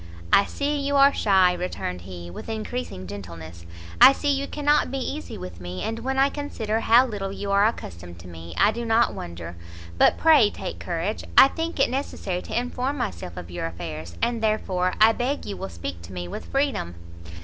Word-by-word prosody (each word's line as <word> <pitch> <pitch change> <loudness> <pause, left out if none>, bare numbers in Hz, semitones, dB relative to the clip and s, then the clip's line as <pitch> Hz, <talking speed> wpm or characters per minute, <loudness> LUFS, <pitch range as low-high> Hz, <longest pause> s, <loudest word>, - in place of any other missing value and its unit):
"I 200 - +7
see 290 +1 -2
you 280 0 -1
are 280 0 +6
shy," 190 -3 +4
returned 175 - -4
he, 85 -1 -9
with 90 - -9
encreasing 220 - -4
gentleness, 85 -3 -9 0.3
"I 275 - +10
see 290 +1 0
you 280 0 -1
cannot 295 -1 +2
be 270 - -3
easy 280 +3 -5
with 90 -1 -9
me; 90 +1 -6
and 225 +1 -3
when 265 +3 -2
I 270 +1 +4
consider 225 -7 -2
how 235 +3 +5
little 200 -5 -4
you 200 0 -4
are 200 +1 +5
accustomed 85 - -6
to 90 - -12
me, 85 -1 -10
I 210 - +5
do 235 +2 -5
not 230 +1 +3
wonder. 85 0 -7 0.4
But - - +5
pray 305 -10 +6
take - - -6
courage; 175 +5 -3
I 270 - +10
think 325 -1 -4
it 270 - +3
necessary 205 -9 -3
to - - -2
inform 250 +3 -3
myself 85 - -4
of 90 -1 -8
your 85 -1 -3
affairs, 85 0 -7
and 235 -1 0
therefore 190 -4 0
I 220 +1 +7
beg 255 +5 -2
you 200 - -4
will 95 - -6
speak 85 0 -6
to 85 +3 -11
me 90 -1 -5
with - - -7
freedom." 275 - -1
200 Hz, 200 wpm, -24 LUFS, -, 0.4 s, I